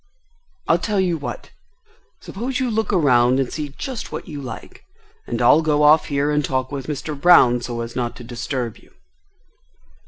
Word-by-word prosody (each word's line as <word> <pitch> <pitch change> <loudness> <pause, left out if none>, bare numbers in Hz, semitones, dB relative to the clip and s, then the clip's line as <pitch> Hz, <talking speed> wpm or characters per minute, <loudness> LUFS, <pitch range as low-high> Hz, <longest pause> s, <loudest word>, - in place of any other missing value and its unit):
"I - - +4
tell 210 -3 -1
you 175 -4 0
what!—Suppose 250 - -8
you 255 -2 -1
look 220 -1 -1
around 130 -8 +3
and 130 -2 -2
see 150 -2 -4
just 260 -5 -6
what - - -6
you 150 -4 -7
like, 130 - -9 0.4
and 120 - -3
I'll 125 +6 +5
go 150 -2 +1
off 150 +2 +6
here 145 +1 0
and 150 0 +1
talk 130 0 -2
with 135 -2 -5
Mr. 150 +1 -4
Brown 140 -6 +5
so 120 -1 -4
as 115 0 -7
not 120 -2 -2
to 120 - -11
disturb 120 0 -4
you." - - -22
145 Hz, 175 wpm, -21 LUFS, 125-170 Hz, 0.4 s, off